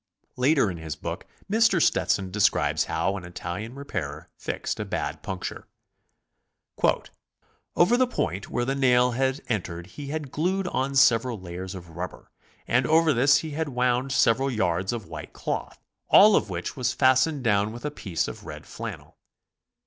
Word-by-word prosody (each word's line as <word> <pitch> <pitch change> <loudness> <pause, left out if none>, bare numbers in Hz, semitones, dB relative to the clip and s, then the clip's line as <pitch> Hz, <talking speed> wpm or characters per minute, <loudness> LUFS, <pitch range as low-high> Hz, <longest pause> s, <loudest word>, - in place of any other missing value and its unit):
Later 130 -4 +3
in 85 - -7
his 80 -2 -5
book - - -6 0.2
Mr. 220 -3 +3
Stetson 95 - +1
de 105 - -4
scribes 80 -6 +3
how 90 +5 -1
an 95 - -8
Italian 90 +6 -6
repairer 80 - -5
fixed - - -4
a - - -1
bad - - -3
puncture: 95 -1 -6 2.1
"Over 220 +8 +4
the 255 0 +3
point 95 - -3
where 120 - -1
the 135 - 0
nail 125 -2 +4
had 130 +3 0
entered 90 -8 -3
he 140 +10 -9
had 150 -2 -4
glued 185 +4 0
on 135 +1 -1
several 120 -3 +4
layers 90 +1 -7
of 90 -2 -10
rubber, 90 +2 -7 0.4
and 125 +1 +2
over 160 0 +4
this 135 +3 +5
he 155 - -5
had 155 +1 -2
wound 125 +1 0
several 130 +1 +3
yards 95 -6 0
of 115 -4 -4
white 80 -2 -9
cloth, - - -4 0.3
all 210 +1 +8
of - - +1
which 85 -1 -4
was 125 -2 0
fastened 130 +2 +3
down 105 -2 +2
with 120 +5 -8
a 150 - -1
piece 95 - -2
of - - -8
red - - -8
flannel. - - -8
120 Hz, 165 wpm, -26 LUFS, 95-140 Hz, 2.1 s, all